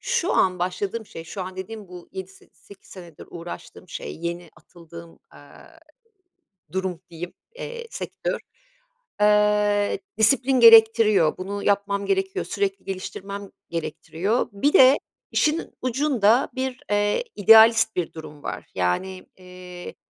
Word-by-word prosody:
şu 475 -7 0
an 185 -1 +2
başladığım 195 +5 -3
şey, 165 - -10
şu 190 +4 -6
an 185 0 -8
dediğim 210 +1 -8
bu 180 -1 -12
yedi 190 -1 -6
se 190 - -20
sekiz 200 -1 -18
senedir 175 -5 -12
uğraştığım 175 +1 -10
şey, - - -7
yeni 170 +1 -5
atıldığım, 170 -1 -14
aaa, 325 - -17 0.9
durum 185 -2 -3
diyeyim, 170 +1 -8 0.2
eee, 475 -1 -7
sektör. - - -4 0.8
Eee, 210 0 +3 0.2
disiplin 255 +3 +3
gerektiriyor. 225 -6 +6
Bunu 200 +2 -5
yapmam 200 0 0
gerekiyor, 385 0 -1
sürekli 395 -1 -2
geliştirmem 195 +1 -6 0.2
gerektiriyor. 170 +5 -2
Bir 275 +9 +1
de 265 +2 +7 0.3
işin 310 +1 0
ucunda 255 -3 +2
bir, 260 -1 -3
eee, 205 - +1
idealist 225 +2 +6
bir 175 -2 -2
durum 150 -2 -11
var. - - -5
Yani, 140 - -2
eee, 180 -1 -11
200 Hz, 125 wpm, -23 LUFS, 180-230 Hz, 0.9 s, de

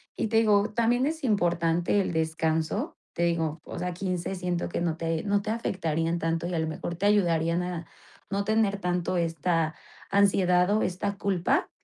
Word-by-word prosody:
Y - - -1
te 225 +1 +1
digo, 210 -2 +4
también 240 +3 +2
es 315 0 -3
importante 175 -3 +2
el 190 - -2
descanso. 160 0 -1 0.2
Te 170 - -2
digo 165 -2 0
o - - -8
sea 180 0 -2
15 185 0 -3
siento 180 -2 -2
que 170 - -3
no 165 -2 -1
te 165 -1 -1
no 200 0 +1
te 215 - -2
afectarían 165 -7 -1
tanto 165 +1 -1
y 180 - -3
a - - 0
lo 160 - 0
mejor 160 +2 -4
te 200 - -2
ayudarían 170 -4 +2
a 175 -2 -4 0.5
no 200 +1 0
tener 215 -1 +1
tanto 180 0 0
esta 165 -1 0 0.3
ansiedad 190 -3 +4
o 215 - +2
esta 200 +3 -1
culpa, 195 -3 +1
180 Hz, 185 wpm, -27 LUFS, 165-200 Hz, 0.5 s, digo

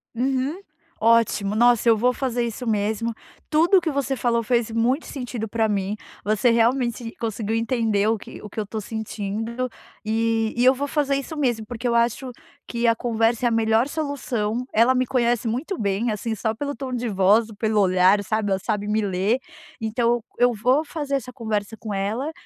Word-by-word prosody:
Uhum, 265 +6 -1 0.4
ótimo. 220 -3 +3
Nossa, 240 +1 +4
eu 225 - +5
vou 250 +3 +2
fazer 245 -2 -1
isso 235 +2 -4
mesmo. 220 +1 0 0.4
Tudo 335 +5 +4
o - - +3
que 325 -2 -1
você 275 -1 -1
falou 235 -2 +1
fez 235 -1 +1
muito 240 +6 +1
sentido 245 -4 -5
para 225 +1 +1
mim. 200 0 -1 0.3
Você 215 +4 +2
realmente 235 0 +1
conseguiu 220 -1 -2
entender 225 -3 +1
o 225 +1 +2
que - - -11
o 210 - -9
que 220 - -6
eu - - 0
estou 215 +2 -5
sentindo, 220 +3 -4 0.3
e 225 0 0
e 245 - +3
eu 260 - +7
vou 280 +2 -3
fazer 285 -1 +1
isso 275 +3 -4
mesmo, 240 -6 0
porque 240 +1 -4
eu 235 - +1
acho 235 +2 +1 0.4
que 235 0 0
a 230 - +4
conversa 230 0 0
é - - +4
a - - -3
melhor 225 +2 +2
solução. 250 -7 -2
Ela 235 +4 +4
me 255 0 +2
conhece 240 -2 +1
muito 270 - -2
bem, 205 +3 0
assim, 220 +2 -3
só 220 +1 -1
pelo 285 +4 -4
tom 265 -2 -5
de 245 0 -2
voz 205 +3 +3
ou 220 - -11
pelo 215 0 +1
olhar, 185 +1 +4
sabe, 215 0 -1
ela 190 - +1
sabe 210 0 -2
me 215 +1 +1
ler. 200 +3 +1 0.4
Então, 230 +1 0 0.2
eu 245 0 +4
vou 250 +7 +2
fazer 290 -3 -3
essa 250 -2 -4
conversa 220 -2 -3
com 215 -2 -6
ela, 215 +10 -2
230 Hz, 195 wpm, -23 LUFS, 215-250 Hz, 0.4 s, eu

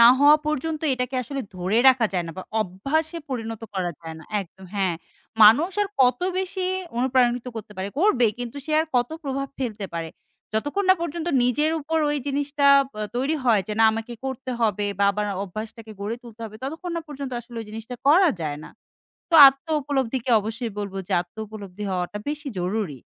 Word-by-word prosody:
না 235 - +10
হওয়া 290 +2 +7
পর্যন্ত 305 +1 -1
এটাকে 250 +1 -3
আসলে 275 +3 -4 0.2
ধরে 185 +5 +1
রাখা 250 -3 +4
যায় 180 -2 0
না, 165 - -6
বা - - -4 0.2
অভ্যাসে 275 - -1
পরিণত 225 -3 -4
করা 185 -2 -1
যায় 165 -1 -7
না 160 - -13 0.2
একদম 190 0 -12
হ্যাঁ, 190 -4 +1 0.5
মানুষ 250 - +7
আর 405 - -2
কত 250 -1 +3 0.2
বেশি 375 0 -2 0.3
অনুপ্রাণিত 250 -1 +2
করতে 215 -1 -7
পারে। 190 +1 -3
করবে 300 - +4
কিন্তু 245 +2 -5
সে 310 - -3
আর 320 - -1
কত 245 0 +1
প্রভাব 275 0 -2
ফেলতে 220 -6 -3
পারে? 165 -1 -3 0.5
যতক্ষণ 290 - 0
না - - +8
পর্যন্ত 340 0 -4 0.2
নিজের 295 +6 +2
উপর 320 +2 -1
ওই 295 - 0
জিনিসটা 285 0 0 0.3
ব্যা 215 0 -3
তৈরি 270 +5 +1
হয়, 225 -5 +4
যে - - -2
না - - +7
আমাকে 225 +2 -5
করতে 265 -1 -5
হবে 210 -2 +1
বা 200 - +3
আবার 210 +1 -2 0.2
অভ্যাসটাকে 215 +3 -8
গড়ে 210 +3 -3
তুলতে 230 -2 -13
হবে, 215 -1 -8
ততক্ষণ 320 +7 -5
না 335 - -3
পর্যন্ত 280 -2 -6
আসলে 235 0 -13
ওই 225 - -8
জিনিসটা 225 +3 -7
করা 355 +5 +6
যায় 150 -2 -3
না। - - -11 0.6
তো - - 0
আত্ম 270 +3 -5 0.2
উপলব্ধিকে 265 -3 -1
অবশ্যই 225 +2 -4
বলব 200 -2 -4
যে - - -2
আত্ম 175 +3 -29
উপলব্ধি 205 -2 -8
হওয়াটা 180 +2 -2
বেশি 295 0 -3
জরুরি। 180 -5 -2
240 Hz, 190 wpm, -24 LUFS, 210-285 Hz, 0.6 s, না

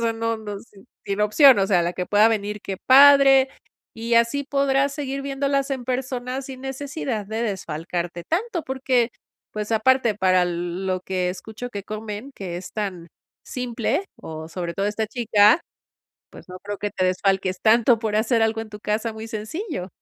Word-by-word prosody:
o 230 - +1
sea, - - 0
no 230 0 -2
no, 210 -2 -7 0.5
sin 200 +1 -2
opción, 245 +5 +6
o 195 - +2
sea, 180 -4 +3
la 170 +1 -1
que 180 - -3
pueda 210 +1 +5
venir, 210 -1 -2
qué 195 -1 -5
padre. 275 0 +7 0.5
Y 230 +1 -5
así 235 +5 +2
podrás 275 0 +1
seguir 275 -1 -4
viéndolas 275 0 -1
en 260 -2 -3
persona 255 0 -3
sin 265 -1 -9
necesidad 270 -4 -4
de 220 +2 -4
desfalcarte 175 -3 -4
tanto, 350 - -2
porque, 260 -3 0 0.4
pues, 210 +1 -4
aparte 235 0 +3
para 185 -2 +3
lo 175 - -2 0.4
lo - - -7
que 185 -1 -2
escucho 220 +6 -8
que 200 -4 -6
comen, 215 +5 -6
que 180 -3 -6
es 180 +1 -8
tan 190 -5 -4 0.4
simple, 250 - -2
o, 160 0 -8
sobre 170 0 -5
todo, 195 - -1
esta 215 +1 -1
chica, 220 +3 +4 0.7
pues, - - -14
no 180 - -8
creo 205 +1 -6
que 205 - -3
te 185 -1 0
desfalques 185 0 0
tanto 230 +1 +4
por 215 -2 -1
hacer 225 +1 +2
algo 225 0 +1
en 225 -1 -6
tu 210 -1 -10
casa 220 +2 -2
muy 220 +1 -8
sencillo. 220 - -5
220 Hz, 180 wpm, -23 LUFS, 200-260 Hz, 0.7 s, padre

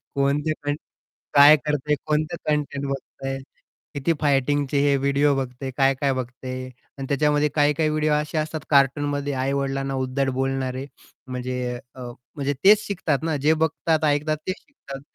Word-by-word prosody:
कोणते 140 +3 +1
कंटें 145 0 -1 0.6
काय 145 +2 +9
करतं 150 +1 -3
आहे? 150 - +4
कोणते 155 +2 0
कंटेंट 145 -2 -1
बघतं 135 0 -6
आहे, 135 - -2 0.6
किती 140 +4 +1
फायटिंगचे 145 0 +1
हे 140 0 +3
व्हिडिओ 140 +1 +2
बघतं 125 -2 -3
आहे? 130 - -2
काय-काय 135 0 +2
बघतं 130 0 -6
आहे? 130 0 -5 0.3
आणि 135 - -4
त्याच्यामध्ये 150 +1 +2
काही-काही 150 +1 +2
व्हिडिओ 155 0 +1
असे 150 +1 -1
असतात 155 0 -2
कार्टूनमध्ये 145 +1 +2
आई-वडिलांना 135 0 -1
उद्धट 130 +1 -1
बोलणारे. 135 0 -2 0.4
म्हणजे 125 -1 -3 0.2
अ, 130 - -11 0.4
म्हणजे 145 0 -1
तेच 210 +2 +6
शिकतात 185 -8 -1
ना 160 -1 0
जे 150 +3 +3
बघतात 160 0 0
ऐकतात 150 +1 +1
ते 185 - 0
शिकतात. 140 - -11
140 Hz, 155 wpm, -23 LUFS, 135-150 Hz, 0.6 s, काय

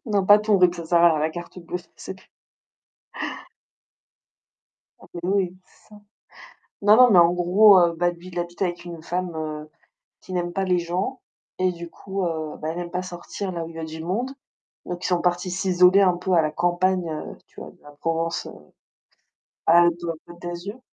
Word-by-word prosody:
Non, 200 -3 +1
pas 205 +1 +8
ton 210 -2 +2
RIB 180 -1 +4
ça 170 -1 -7
sert 170 +1 +3
à 170 - +7
rien, 155 - 0
la 155 +1 0
carte 175 +2 -9
bleue 180 +1 -5 0.2
c'est 190 - -8
p 190 - -19 2.8
Non - - -16
mais 175 - -5
oui. 185 -1 0
C'est - - -27
ça. 210 - -14 0.8
Non 210 +2 +6
non 250 -1 +7
mais 185 - +6
en 170 0 +6
gros, 185 +3 +6
heu, 170 -1 +3
bah, 175 +1 +2
lui 175 +1 -12
il 175 -1 -7
habite 175 +1 -5
avec 175 -1 -2
une 170 -2 -8
femme, 180 0 -3
heu, 155 -1 -5 0.5
qui 185 - -10
n'aime 175 -1 -2
pas 195 - -1
les 180 -2 +2
gens. 180 +10 -3 0.4
Et 185 0 +2
du 170 0 -9
coup, 195 +2 -5
heu, 160 -2 -4
bah, 155 - -4
elle 175 - -5
aime 175 -1 -6
pas 180 0 -2
sortir 185 +2 -6
là 170 -2 -4
où - - -9
il 165 - -13
y 165 - -6
a - - -5
du 160 0 -8
monde. 230 +10 -2 0.5
Donc 175 0 -6
ils - - +1
sont 180 -1 +1
partis 180 +1 0
s'isoler 185 +1 +4
un 180 -2 +3
peu 185 +1 -2
à 165 - +5
la 155 -1 -1
campagne, 175 +1 0 0.4
tu - - -14
vois, - - -9
de - - -26
la 145 - -13 1.6
Provence-Alpes-Côte 170 0 +1
d'Azur. 175 +7 -6
175 Hz, 200 wpm, -23 LUFS, 170-185 Hz, 2.8 s, pas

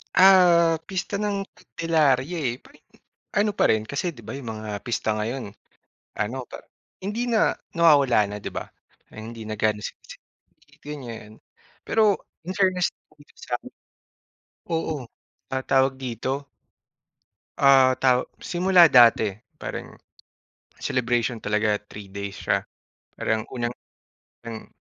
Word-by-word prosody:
Ah, 175 -3 +6
Pista 190 +1 -3
ng 205 -1 -1
Candelaria 155 -1 0
eh. 125 -6 -1
Parang 150 - -20
yung, 225 - -25 0.4
ano 210 +1 +3
pa - - +2
rin 110 -1 +2
kasi 140 +8 -2
'di 125 -8 -14
ba, - - -6
'yong 135 -4 -6
mga 110 -1 -6
pista 115 -3 -1
ngayon, 110 0 -4 0.7
ano 110 +5 -2
pa - - -7 0.5
hindi 215 +5 -2
na 225 -2 +3 0.2
nawawala 140 -10 +5
na 105 - -5
'di - - -4
ba. - - -4 0.5
Hindi 110 +1 -8
na 110 0 -5
gaanong 105 -1 +1
sine-celabrate - - -14
ganyan. 120 -7 -8 0.5
Pero 215 -3 +3 0.3
in 185 - -2
fairness 185 -2 +2 0.2
dito 145 - -21
samin 120 -1 -5 1.0
Oo 160 -5 -2 0.4
ta 130 0 -2
tawag 135 0 +3
dito 130 +2 -4 1.1
ah, 135 -2 +6
taw 125 -1 +3 0.2
simula 180 0 +5
dati, 115 -7 +6 0.2
parang - - -7 0.8
celebration 120 -2 -1
talaga 105 0 +1
3 105 -1 -9
days 100 0 -5
siya. 100 -1 0 0.6
Parang 110 0 -1 0.8
unang-unang 115 -2 -10
130 Hz, 125 wpm, -24 LUFS, 110-170 Hz, 1.1 s, Ah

